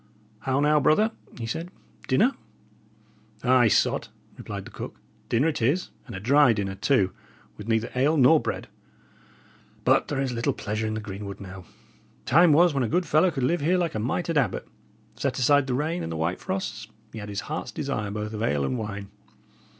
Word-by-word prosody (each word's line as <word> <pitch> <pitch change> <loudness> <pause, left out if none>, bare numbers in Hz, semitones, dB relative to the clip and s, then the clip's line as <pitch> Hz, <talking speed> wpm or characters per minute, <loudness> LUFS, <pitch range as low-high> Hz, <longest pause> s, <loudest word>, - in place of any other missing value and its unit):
"How 135 0 0
now, 150 +1 +4
brother?" 210 +10 +3 0.3
he 115 - -4
said. 165 +10 -4 0.4
"Dinner?" 215 - +4 1.1
"Ay, 125 -2 +5
sot," - - +2 0.3
replied - - -7
the - - -11
cook, - - -8 0.3
"dinner 120 +7 +2
it 150 - -3
is, 145 +11 +1 0.2
and 115 - -7
a - - -4
dry 135 +4 +5
dinner, 100 -2 -2
too, 95 -2 +2 0.4
with 105 - -10
neither 115 0 0
ale 140 +5 +2
nor 150 +4 +6
bread. - - -4 1.2
But - - +4
there 140 - -2
is 135 -2 0
little 115 0 0
pleasure 110 +1 -3
in 110 - -2
the 110 - -3
greenwood 100 -1 -7
now; 95 -1 -9 0.6
time 170 +1 +6
was 170 +2 +5
when 140 - 0
a 120 - 0
good 180 +8 +1
fellow 155 +4 +4
could 135 -6 -3
live 170 +6 +1
here 175 +5 +2
like 175 -3 0
a 110 - -2
mitred 150 +7 0
abbot, 135 - -1 0.5
set - - -2
aside 145 +2 +4
the 125 - 0
rain 160 +6 -1
and 80 - -4
the 80 - -3
white 80 +3 -1
frosts; 190 - -4 0.3
he 110 - -6
had 105 0 -7
his 100 0 -3
heart's 155 - -5
desire 140 -9 -3
both 105 +1 -4
of 105 - -4
ale 75 -11 +1
and 125 - -2
wine. 100 -2 -5
125 Hz, 195 wpm, -26 LUFS, 105-150 Hz, 1.2 s, nor